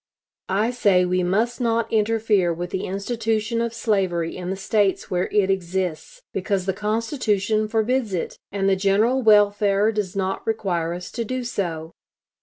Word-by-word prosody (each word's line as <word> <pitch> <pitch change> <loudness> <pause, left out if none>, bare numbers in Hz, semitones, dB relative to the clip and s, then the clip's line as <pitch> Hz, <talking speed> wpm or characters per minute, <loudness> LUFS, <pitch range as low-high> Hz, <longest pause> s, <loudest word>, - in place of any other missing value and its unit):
I 210 +5 +1
say 200 -7 +3
we 180 0 +1
must 220 +8 0
not 230 -1 0
interfere 215 -4 +2
with 175 +1 -4
the 190 - -2
institution 220 +3 -1
of 235 0 -1
slavery 190 -7 -1
in 180 -1 -5
the 190 - -1
States 195 0 0
where 180 0 0
it 200 -2 +3
exists, 190 - -3
because 195 0 -1
the 190 - 0
Constitution 215 0 0
forbids 225 +1 0
it, 180 -3 -3 0.2
and 195 0 0
the 195 - +4
general 210 +7 +2
welfare 205 -1 +4
does 205 -4 -3
not 190 +1 -2
require 175 -6 -1
us 180 0 -8
to 235 - -3
do 255 +3 -3
so. 170 -8 -4
205 Hz, 160 wpm, -23 LUFS, 185-225 Hz, 0.2 s, the